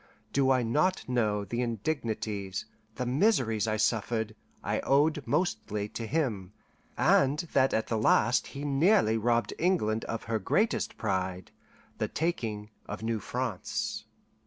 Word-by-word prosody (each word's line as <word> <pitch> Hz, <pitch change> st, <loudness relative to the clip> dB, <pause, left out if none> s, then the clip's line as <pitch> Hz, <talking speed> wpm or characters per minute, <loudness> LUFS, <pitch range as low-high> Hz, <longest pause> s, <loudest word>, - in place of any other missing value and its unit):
Do 135 Hz, -1 st, +3 dB
I 130 Hz, -2 st, +3 dB
not 150 Hz, +11 st, +1 dB
know, 105 Hz, -5 st, 0 dB
the 120 Hz, +5 st, -2 dB
indignities, 110 Hz, -5 st, -2 dB, 0.3 s
the 125 Hz, -, -2 dB
miseries 125 Hz, -, +2 dB
I 110 Hz, 0 st, 0 dB
suffered, 110 Hz, 0 st, 0 dB, 0.3 s
I -, -, 0 dB
owed 150 Hz, +2 st, +2 dB
mostly 110 Hz, -, -1 dB
to 115 Hz, +1 st, -5 dB
him, 110 Hz, -, -1 dB, 0.4 s
and 140 Hz, +2 st, +4 dB, 0.2 s
that 135 Hz, -1 st, +4 dB
at 110 Hz, -, +1 dB
the 110 Hz, -, -1 dB
last 115 Hz, +2 st, +3 dB
he 140 Hz, +1 st, -6 dB
nearly 145 Hz, -, +3 dB
robbed 115 Hz, 0 st, +1 dB
England 115 Hz, -, +1 dB
of 115 Hz, -, -4 dB
her 115 Hz, -1 st, -1 dB
greatest 210 Hz, -, 0 dB
pride, 95 Hz, -3 st, -2 dB, 0.5 s
the -, -, 0 dB
taking 110 Hz, -11 st, -2 dB, 0.2 s
of 105 Hz, +2 st, -6 dB
New 115 Hz, -1 st, -1 dB
France? 120 Hz, -, -3 dB
115 Hz, 135 wpm, -29 LUFS, 105-140 Hz, 0.5 s, and